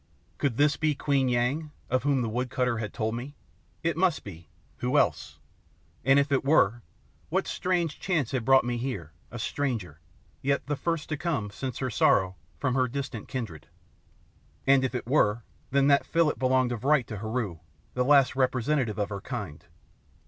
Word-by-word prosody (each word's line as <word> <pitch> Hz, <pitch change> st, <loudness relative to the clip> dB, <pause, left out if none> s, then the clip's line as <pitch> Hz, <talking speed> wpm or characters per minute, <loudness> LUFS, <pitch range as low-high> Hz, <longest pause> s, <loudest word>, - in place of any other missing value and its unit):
Could 135 Hz, -5 st, 0 dB
this 145 Hz, 0 st, +3 dB
be 155 Hz, -1 st, +1 dB
Queen 135 Hz, -2 st, +1 dB
Yang, 125 Hz, +6 st, 0 dB, 0.2 s
of 130 Hz, +1 st, +1 dB
whom 135 Hz, -2 st, +1 dB
the -, -, -1 dB
woodcutter 125 Hz, 0 st, -1 dB
had 105 Hz, -2 st, -4 dB
told 110 Hz, 0 st, -2 dB
me? 130 Hz, +5 st, -6 dB, 0.5 s
It 165 Hz, 0 st, +1 dB
must 175 Hz, -1 st, +1 dB
be 85 Hz, -5 st, -11 dB, 0.3 s
who 125 Hz, +4 st, 0 dB
else? -, -, +1 dB, 0.7 s
And 135 Hz, +1 st, +5 dB
if 140 Hz, 0 st, +2 dB
it 135 Hz, -, +2 dB
were, 120 Hz, -6 st, +3 dB, 0.5 s
what -, -, 0 dB
strange 175 Hz, -4 st, -1 dB
chance 165 Hz, -, 0 dB
had 130 Hz, -4 st, -1 dB
brought 135 Hz, +2 st, +5 dB
me 120 Hz, 0 st, -2 dB
here 115 Hz, -, -4 dB, 0.2 s
a 120 Hz, -, -7 dB
stranger, 115 Hz, -, -3 dB, 0.4 s
yet 140 Hz, +1 st, 0 dB
the 145 Hz, -, -1 dB
first 165 Hz, +1 st, -2 dB
to 155 Hz, -, -2 dB
come, 140 Hz, -11 st, -2 dB
since 130 Hz, +3 st, -5 dB
her 130 Hz, -2 st, -2 dB
sorrow, 95 Hz, -3 st, +3 dB, 0.2 s
from 130 Hz, -3 st, 0 dB
her 130 Hz, -1 st, +2 dB
distant 130 Hz, -4 st, -5 dB
kindred? 110 Hz, -, -6 dB, 1.0 s
And 135 Hz, -1 st, +5 dB
if 130 Hz, 0 st, -1 dB
it 125 Hz, -, -3 dB
were, 115 Hz, -4 st, +2 dB, 0.3 s
then 140 Hz, 0 st, +3 dB
that 140 Hz, 0 st, +4 dB
fillet 165 Hz, -2 st, +2 dB
belonged 130 Hz, -1 st, +2 dB
of 120 Hz, -1 st, -4 dB
right 140 Hz, -2 st, +3 dB
to 110 Hz, -, -6 dB
Heru, 110 Hz, -5 st, -3 dB, 0.3 s
the 125 Hz, -, +1 dB
last 140 Hz, -1 st, +5 dB
representative 130 Hz, -3 st, +1 dB
of 105 Hz, -1 st, -1 dB
her 100 Hz, -2 st, -5 dB
kind. 100 Hz, -, -6 dB
130 Hz, 180 wpm, -28 LUFS, 115-140 Hz, 1.0 s, And